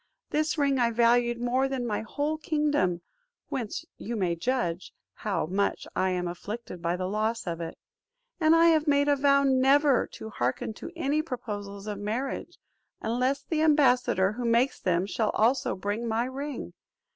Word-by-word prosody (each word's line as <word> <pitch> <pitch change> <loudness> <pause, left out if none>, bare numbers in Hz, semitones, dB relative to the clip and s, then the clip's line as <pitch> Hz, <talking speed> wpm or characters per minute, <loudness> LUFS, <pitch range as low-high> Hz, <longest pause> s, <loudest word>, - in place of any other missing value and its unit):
This 310 +1 0
ring 280 -2 +2
I 235 -1 +3
valued 235 +1 +3
more 250 +2 +1
than 265 -2 -3
my 210 -3 -1
whole 290 +8 -2
kingdom; 295 - 0 0.5
whence 240 -6 -4
you 235 +3 -4
may 180 -5 0
judge 185 -3 -2 0.2
how 205 -6 -2
much 195 +5 -1
I 190 - +2
am 180 -1 -1
afflicted 180 +1 -6
by 170 +1 0
the 185 0 -3
loss 215 +4 -1
of 170 -1 -3
it. 165 -1 -6 0.6
And 315 0 +5
I 335 0 +6
have 315 -1 +3
made 285 0 +3
a 290 - +4
vow 280 0 +4
never 270 0 +4
to 220 - -8
hearken 130 - -2
to - - -8
any 305 -2 +1
proposals 205 -8 -6
of 210 -2 -4
marriage, 225 +7 -3 0.4
unless 255 +5 0
the 310 0 -1
ambassador 250 -10 +3
who 240 +3 -5
makes 235 +3 +2
them 180 0 +1
shall 210 +1 -1
also 240 +5 +2
bring 205 +5 -3
my 225 +1 0
ring. 275 +3 -5
240 Hz, 170 wpm, -28 LUFS, 205-280 Hz, 0.6 s, I